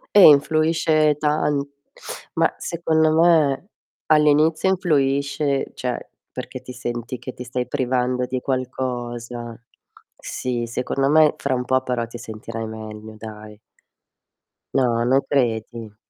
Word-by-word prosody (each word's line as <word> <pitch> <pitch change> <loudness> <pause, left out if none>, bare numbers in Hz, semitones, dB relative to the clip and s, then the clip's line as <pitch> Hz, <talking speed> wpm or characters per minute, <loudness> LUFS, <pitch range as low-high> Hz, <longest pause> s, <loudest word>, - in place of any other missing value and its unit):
Eh, 205 - +9
influisce 155 +1 +3
tan 150 -1 +1 0.7
ma - - +2
secondo 160 -2 +1
me 160 -1 +3 0.4
all'inizio 155 +3 +4
influisce, 140 -5 +1
cioè 125 -1 -4 0.2
perché - - -7
ti 125 - -10
senti 120 0 -5
che 125 +1 -7
ti 125 - -8
stai 125 0 -3
privando 125 -1 0
di 130 0 -3
qualcosa. 120 -3 -4 0.6
Sì, 120 -2 -3
secondo 130 +3 -1
me 155 0 +5
fra 140 -2 -1
un 125 - -2
po' 130 +1 +2
però 125 -2 -2
ti 120 - -9
sentirai 115 0 -6
meglio 110 0 -8
dai. 105 -1 -10 1.1
No, 120 -3 +2
non 130 +3 +3
credi? 115 -4 -1
130 Hz, 120 wpm, -22 LUFS, 120-150 Hz, 1.1 s, Eh